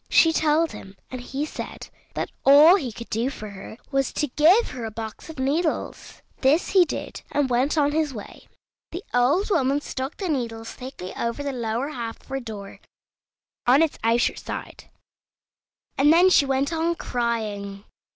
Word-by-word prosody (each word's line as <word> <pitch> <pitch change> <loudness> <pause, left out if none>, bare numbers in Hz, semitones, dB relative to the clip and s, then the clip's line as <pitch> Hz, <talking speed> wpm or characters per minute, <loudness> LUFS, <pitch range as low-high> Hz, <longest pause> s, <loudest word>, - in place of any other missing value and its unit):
She 325 -1 +5
told 315 +1 +2
him, 190 0 -11
and 255 -1 -5
he 270 +4 -3
said - - -7 0.3
that - - -3
all 290 +5 +8
he 275 -11 -2
could 235 +2 -10
do 235 +4 0
for 215 -6 -8
her 200 +2 -10
was 275 -1 +1
to 295 - -1
give 340 - +4
her 250 -2 -6
a 225 - -3
box 220 +5 -8
of 320 - -9
needles. 295 +6 -2 0.2
This 285 +6 +3
he 375 -2 +5
did, - - -6
and 285 -3 0
went 260 +6 +1
on 290 -1 +3
his 305 -1 0
way. 215 -5 -10 0.4
The 355 +4 -6
old 280 - +2
woman 275 -4 +2
stuck 265 0 -5
the 385 - -3
needles 230 -7 -3
thickly 250 -8 -8
over 235 +5 -3
the 280 -1 -3
lower 235 +3 -2
half 235 -6 -6
of - - -24
her 270 0 -2
door, 210 -5 -8 0.9
on 270 +6 +6
its 320 - -2
outer 230 +1 +2
side, - - -8 1.1
and 290 +2 +6
then 355 +3 +6
she 280 - +5
went 270 +3 0
on 330 +1 0
crying. 210 -7 -3
270 Hz, 175 wpm, -24 LUFS, 235-305 Hz, 1.1 s, all